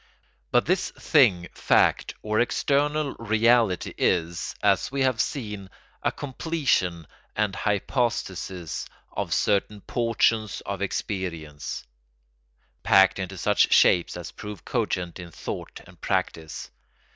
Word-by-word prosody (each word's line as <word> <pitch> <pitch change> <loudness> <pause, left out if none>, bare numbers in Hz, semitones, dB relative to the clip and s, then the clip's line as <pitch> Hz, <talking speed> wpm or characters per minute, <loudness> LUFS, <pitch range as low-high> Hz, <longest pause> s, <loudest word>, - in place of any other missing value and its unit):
But 120 - +3
this 185 +3 +1
thing, 105 - +3
fact, - - +2
or 110 0 0
external 145 +3 +1
reality 115 -3 +2
is, 85 -1 0
as 100 +2 +2
we 135 0 -1
have 130 -4 +2
seen, 105 -8 -4 0.3
a - - +1
completion 130 - -1 0.3
and 105 -2 0
hypostasis 100 - -2 0.3
of - - -3
certain 105 0 +1
portions 115 -2 +1
of 100 -1 -4
experience, 85 -7 -4 1.0
packed 95 0 +5
into 95 0 -5
such 105 +3 +3
shapes 85 0 +4
as 90 0 -7
prove 105 -1 -9
cogent 95 -7 -2
in 90 -1 -8
thought - - -7
and - - -18
practice. 80 -2 -2
105 Hz, 110 wpm, -25 LUFS, 90-120 Hz, 1.0 s, packed